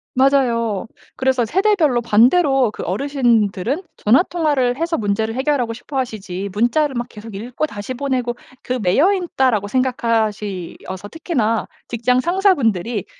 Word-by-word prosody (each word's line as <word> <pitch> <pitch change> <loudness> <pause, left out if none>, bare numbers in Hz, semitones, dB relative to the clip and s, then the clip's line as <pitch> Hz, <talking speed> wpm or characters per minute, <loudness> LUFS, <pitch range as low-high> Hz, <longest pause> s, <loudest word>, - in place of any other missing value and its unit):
맞아요. 240 -6 +2 0.3
그래서 260 -2 +1
세대별로 340 - +2
반대로 255 +3 +4
그 - - -8
어르신들은 235 - 0
전화 240 +10 +4
통화를 290 -9 0
해서 330 +1 -1
문제를 220 +2 -1
해결하고 260 -3 0
싶어하시지 220 -7 -4
문자를 250 +7 +1
막 240 0 -2
계속 215 -2 -11
읽고 245 +8 -3
다시 205 +1 -6
보내고 255 -2 -2 0.3
그 255 0 -2
'매여 280 - +3
있다.'라고 265 - 0
생각하시어서 210 -6 -2
특히나 235 - -1 0.2
직장 245 +2 +1
상사분들이 255 - +1
245 Hz, 335 characters per minute, -19 LUFS, 215-280 Hz, 0.3 s, 반대로